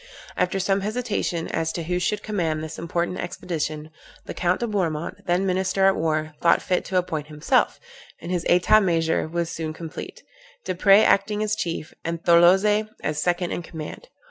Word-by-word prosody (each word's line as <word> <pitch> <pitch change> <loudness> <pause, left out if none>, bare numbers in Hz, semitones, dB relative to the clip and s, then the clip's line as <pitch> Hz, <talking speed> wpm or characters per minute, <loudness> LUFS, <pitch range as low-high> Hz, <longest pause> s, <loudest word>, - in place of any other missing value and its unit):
After 180 +2 0
some 195 +1 +1
hesitation 210 -6 -2
as 160 0 -1
to 170 - -3
who 180 +2 -1
should 200 +3 -1
command 165 -7 -1
this 160 0 -7
important 170 +2 -2
expedition, 160 -4 -4 0.3
the - - -6
Count 180 +1 0
de - - +1
Bourmont, 170 -8 -3
then 180 +2 +2
minister 190 +1 +1
at 195 0 +5
war, 155 -1 -1
thought 170 - +4
fit 180 -1 0
to 190 - -1
appoint 160 -4 -2
himself; 150 -1 +1 0.4
and 175 - -7
his 175 -2 -1
etat 180 +5 +5
major 165 -4 +1
was 170 +1 -2
soon 160 -1 -4
complete, 160 0 -8 0.4
Desprez 195 +3 +5
acting 210 +2 +2
as 215 0 0
chief, 170 -7 -4
and 165 0 -4
Tholozé 190 +5 +5
as 150 0 -1
second 175 +1 0
in - - -3
command. 160 - -8
175 Hz, 170 wpm, -24 LUFS, 165-195 Hz, 0.4 s, at